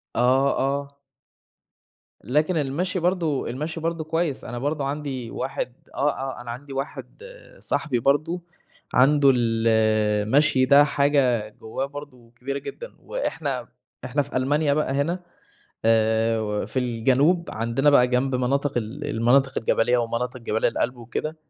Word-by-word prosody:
آه 130 +3 +3
آه. 140 +1 -2 1.3
لكن 150 - +1
المشي 165 +7 -1
برضو 170 -5 0
المشي 155 +7 -4
برضو 165 0 -2
كويّس، 160 -2 -2
أنا 120 - -5
برضو 145 +2 -2
عندي 135 -4 -4
واحد 135 -2 -4 0.2
آه 145 - +2
آه 135 -2 -5
أنا 120 -1 -6
عندي 135 +3 -8
واحد 140 - -6 0.4
صاحبي 135 -7 -1
برضو، 155 +8 +1 0.5
عنده 140 +2 +5
ال 115 -1 +1 0.6
المشي 130 +1 +3
ده 140 +2 +7
حاجة 140 -6 +2
جواه 110 +5 -5
برضو 140 -4 -11
كبيرة 130 +4 -5
جدًا، 480 - -8
وإحنا - - -3 0.4
إحنا 140 +3 0
في 140 -1 -4
ألمانيا 145 +3 +2
بقى 150 -2 0
هنا، 160 +6 0 0.7
آآ 110 0 +3
و 105 -1 -2
في 130 - -2
الجنوب 130 +8 +2
عندنا 115 +6 +1
بقى 125 -3 +5
جنب 130 +1 0
مناطق 140 +2 0
ال 120 +6 -4
المناطق 130 +4 +2
الجبلية 120 +2 +2
ومناطق 120 +2 -2
جبال 110 -1 -1
الألب 125 +2 0
وكده، 120 +7 -4
135 Hz, 135 wpm, -24 LUFS, 120-145 Hz, 1.3 s, ده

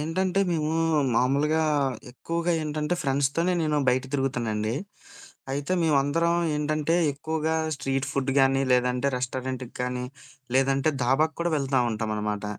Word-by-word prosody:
ఏంటంటే 185 +5 0
మేము 155 -2 0 0.4
మామూలుగా 145 +5 +2 0.5
ఎక్కువగా 170 +7 -2
ఏంటంటే 150 +2 -1
ఫ్రెండ్స్‌తోనే 140 +5 +1
నేను 150 -1 +1
బయట 125 +1 +3
తిరుగుతానండి. 115 -5 -1 0.8
అయితే 140 +5 -2
మేమందరం 160 +2 +2 0.2
ఏంటంటే 155 +2 0 0.2
ఎక్కువగా 160 +2 -2 0.2
స్ట్రీట్ 135 0 -2
ఫుడ్ 135 -1 0
గానీ, 135 0 +3
లేదంటే 125 +2 +2
రెస్టారెంట్‌కి 130 0 -4
కానీ, 125 0 -2 0.5
లేదంటే 135 +2 +2
దాబాకు 150 +6 +2
కూడా 170 - 0
వెళ్తూ 135 -2 +1
ఉంటాం 110 0 -3
అనమాట. 105 0 -3
140 Hz, 120 wpm, -26 LUFS, 125-155 Hz, 0.8 s, బయట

